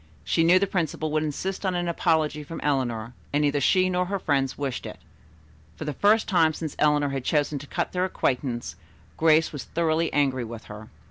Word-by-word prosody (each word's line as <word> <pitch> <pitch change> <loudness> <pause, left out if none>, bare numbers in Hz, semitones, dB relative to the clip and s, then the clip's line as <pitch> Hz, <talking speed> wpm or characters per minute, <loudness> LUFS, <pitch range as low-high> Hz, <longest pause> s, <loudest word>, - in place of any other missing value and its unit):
She 165 - +1
knew 175 +3 +6
the 195 - +2
principal 160 -4 -2
would 155 0 +1
insist 170 +7 -3
on 185 -2 0
an 175 0 -1
apology 160 -3 +1
from 165 +3 -7
Eleanor, 125 -5 -1 0.2
and 145 +1 +1
neither 145 -1 +1
she 185 +6 +4
nor 180 0 0
her 200 +1 -1
friends 135 -7 0
wished 140 -3 -3
it. - - -8 0.8
For - - -7
the 150 - -2
first 210 +7 +3
time 165 -5 +3
since 160 -3 -5
Eleanor 150 -1 +3
had 135 -2 -3
chosen 145 0 0
to 145 - -10
cut - - -2
their 180 0 0
acquaintance 125 -8 -2 0.4
Grace 160 0 +3
was 145 - -6
thoroughly 165 0 0
angry 135 -3 +1
with 115 -1 -8
her. 105 +1 -10
150 Hz, 200 wpm, -25 LUFS, 140-170 Hz, 0.8 s, knew